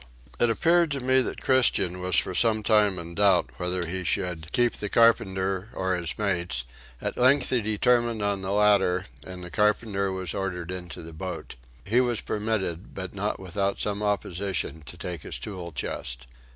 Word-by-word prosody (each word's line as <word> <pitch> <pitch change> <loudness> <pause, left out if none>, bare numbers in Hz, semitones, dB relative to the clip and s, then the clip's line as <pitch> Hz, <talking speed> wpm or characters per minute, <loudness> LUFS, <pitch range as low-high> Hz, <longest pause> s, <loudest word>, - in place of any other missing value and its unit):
It 120 - +5
appeared 170 +8 +3
to 140 - -2
me 130 +1 +3
that - - -3
Christian 115 -9 +3
was 90 0 +2
some 110 +2 +2
time 105 -3 +3
in 85 0 -7
doubt 95 -2 +3
whether 90 0 -1
he 95 +2 -3
should 85 -2 -2
keep 120 -1 +3
the 105 - -2
carpenter 95 -4 +2
or 95 0 0
his 85 -3 -3
mates; 85 - 0 0.3
at - - -4
length 130 +2 +4
he 125 -2 +2
determined 115 +1 +1
on 100 -1 0
the 95 - -4
latter 100 -3 +3 0.2
and 90 -1 -7
the 90 - -9
carpenter 105 -2 +1
was 95 -3 -3
ordered 90 -3 -3
into 90 -2 -7
the 80 0 -10
boat. 90 +3 -6 0.3
He 120 +5 +3
was 120 -3 0
permitted 105 -5 -2
but 95 -2 -5
not 105 +1 -2
without 95 +1 -2
some 105 0 -1
opposition 100 -5 -1
to 60 - -8
take 85 -3 -4
his - - -6
tool 90 -4 -7
chest. 60 -3 -4
95 Hz, 175 wpm, -26 LUFS, 90-110 Hz, 0.3 s, It